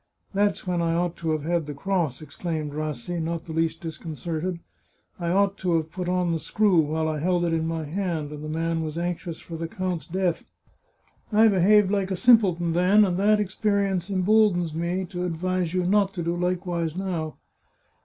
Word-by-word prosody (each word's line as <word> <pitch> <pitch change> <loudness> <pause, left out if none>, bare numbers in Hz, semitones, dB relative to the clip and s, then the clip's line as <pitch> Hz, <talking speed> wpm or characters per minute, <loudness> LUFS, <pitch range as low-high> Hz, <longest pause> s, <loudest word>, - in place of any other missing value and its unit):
" - - -40
That's 200 0 +1
when 180 -2 0
I 165 0 +1
ought 175 0 0
to 165 - -3
have 155 -2 0
had 170 -1 0
the 145 - -5
cross," 165 -4 -1
exclaimed 155 0 -4
Rassi, 155 +2 -3
not 165 0 -3
the 165 - -8
least 165 0 0
disconcerted. 165 +2 -4 0.3
" - - -39
I 170 -1 -2
ought 200 +2 +2
to 180 -2 +1
have 160 -1 -3
put 180 0 -4
on 180 -1 +1
the 165 - 0
screw 205 0 +2
while 160 +1 +1
I 155 -1 -1
held 175 +2 +1
it 170 - 0
in 160 0 0
my 165 -1 -2
hand, 160 -2 -3
and 150 0 -7
the 155 - -5
man 165 +1 -1
was 155 0 -4
anxious 175 -1 -3
for 165 - -8
the 165 0 -3
count's 185 -3 -3
death. 180 -1 -1 0.9
I 220 +1 +6
behaved 200 +1 +4
like 200 -2 0
a 190 - -1
simpleton 185 -8 +4
then, 190 +5 +5
and 180 -2 0
that 210 +2 +4
experience 200 -2 0
emboldens 190 -3 +3
me 175 +3 -1
to 180 0 -5
advise 180 0 -1
you 180 - +2
not 195 +1 +2
to 175 - -2
do 170 +1 -1
likewise 175 -2 -1
now." 175 -5 -3
175 Hz, 200 wpm, -25 LUFS, 160-190 Hz, 0.9 s, I